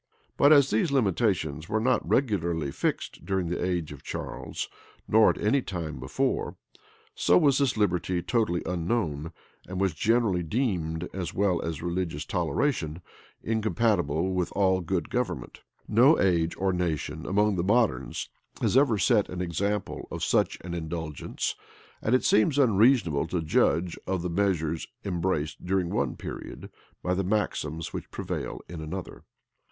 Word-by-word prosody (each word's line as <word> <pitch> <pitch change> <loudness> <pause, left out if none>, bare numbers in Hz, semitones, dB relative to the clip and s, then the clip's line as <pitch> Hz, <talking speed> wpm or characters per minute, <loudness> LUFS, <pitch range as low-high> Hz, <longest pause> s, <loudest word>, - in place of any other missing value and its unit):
But 145 - +5
as 140 -3 +6
these 110 +8 +2
limitations 95 - 0
were 110 - +1
not 125 +3 +2
regularly 85 - +1
fixed - - -2
during 95 -3 -1
the 90 - -2
age 90 -4 -1
of - - -10
Charles, - - -5 0.4
nor 110 0 +6
at - - 0
any 120 +6 +2
time 80 - -5
before, 130 - -1 0.6
so 445 0 +4
was 145 -5 +4
this 135 -4 +1
liberty 90 -3 0
totally 110 -8 0
unknown, 85 -3 -1 0.4
and 95 0 -4
was 95 -3 +1
generally 110 +1 +2
deemed, 85 - -1
as 95 -2 -4
well 95 -3 +2
as 80 -1 -4
religious 85 -4 -2
toleration, 85 - -1 0.4
incompatible 105 -7 +1
with 90 -2 -1
all 95 -2 +2
good 90 +1 -2
government. 120 - -3 0.3
No 125 +9 +5
age 85 -3 +2
or 95 0 +1
nation 80 -3 -2
among 105 +1 +2
the 85 - 0
moderns 115 +4 +1 0.3
had - - +1
ever 130 -5 +4
set 105 +1 +3
an 90 - -5
example 95 +3 -2
of - - -5
such - - +2
an 90 0 -6
indulgence; 80 -2 -3 0.5
and 115 - +2
it 130 - +2
seems 130 +7 +4
unreasonable 110 - +4
to 90 +1 -1
judge 80 +2 +1
of 95 -2 -1
the 90 - -2
measures 85 -4 0 0.2
embraced 85 -5 -1
during 90 -1 0
one - - 0
period - - -8 0.3
by 90 - +1
the 95 +1 0
maxims 85 -6 -2
which - - -6
prevail - - -4
in 85 -3 -7
another. 90 +4 -7
90 Hz, 150 wpm, -27 LUFS, 85-110 Hz, 0.6 s, as